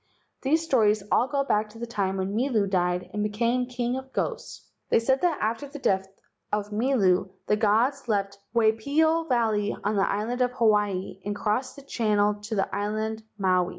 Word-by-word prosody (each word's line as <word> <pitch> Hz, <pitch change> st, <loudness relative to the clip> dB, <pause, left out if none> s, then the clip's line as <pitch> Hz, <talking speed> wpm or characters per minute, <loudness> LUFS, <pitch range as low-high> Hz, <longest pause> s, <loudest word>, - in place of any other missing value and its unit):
These 315 Hz, +4 st, +2 dB
stories 215 Hz, -8 st, +3 dB
all 245 Hz, -, +3 dB
go 280 Hz, 0 st, 0 dB
back 215 Hz, -5 st, 0 dB
to 220 Hz, -, -14 dB
the 235 Hz, -, -4 dB
time 200 Hz, -5 st, -2 dB
when 190 Hz, +1 st, -2 dB
Milu 225 Hz, -3 st, +1 dB
died 180 Hz, -1 st, 0 dB
and 210 Hz, 0 st, -1 dB
be¬ 210 Hz, -, -1 dB
came 240 Hz, +3 st, 0 dB
the -, -, -16 dB
king 245 Hz, 0 st, -1 dB
of 265 Hz, 0 st, -7 dB
ghosts. -, -, -4 dB, 0.2 s
They -, -, +4 dB
say 230 Hz, +4 st, +3 dB
that 345 Hz, -4 st, +2 dB
after 225 Hz, +6 st, -1 dB
the 285 Hz, -, -9 dB
death 190 Hz, -8 st, +1 dB, 0.4 s
of 210 Hz, 0 st, -2 dB
Milu 210 Hz, -6 st, +2 dB, 0.2 s
the 210 Hz, -, +2 dB
gods 235 Hz, +6 st, +2 dB
left 200 Hz, -2 st, -1 dB, 0.2 s
Waipio 280 Hz, +9 st, +2 dB
Valley 220 Hz, -4 st, +1 dB
on 210 Hz, +1 st, 0 dB
the 195 Hz, -, +2 dB
island 225 Hz, +5 st, -2 dB
of 250 Hz, 0 st, +2 dB
Hawaii 210 Hz, -5 st, +1 dB
and 205 Hz, +1 st, -3 dB
crossed 215 Hz, +5 st, -1 dB
the 280 Hz, -, -12 dB
channel 210 Hz, -5 st, +1 dB
to 210 Hz, +2 st, -6 dB
the 195 Hz, -, -1 dB
island 215 Hz, +2 st, -2 dB, 0.2 s
Maui. 185 Hz, -3 st, +2 dB
215 Hz, 190 wpm, -26 LUFS, 205-250 Hz, 0.4 s, They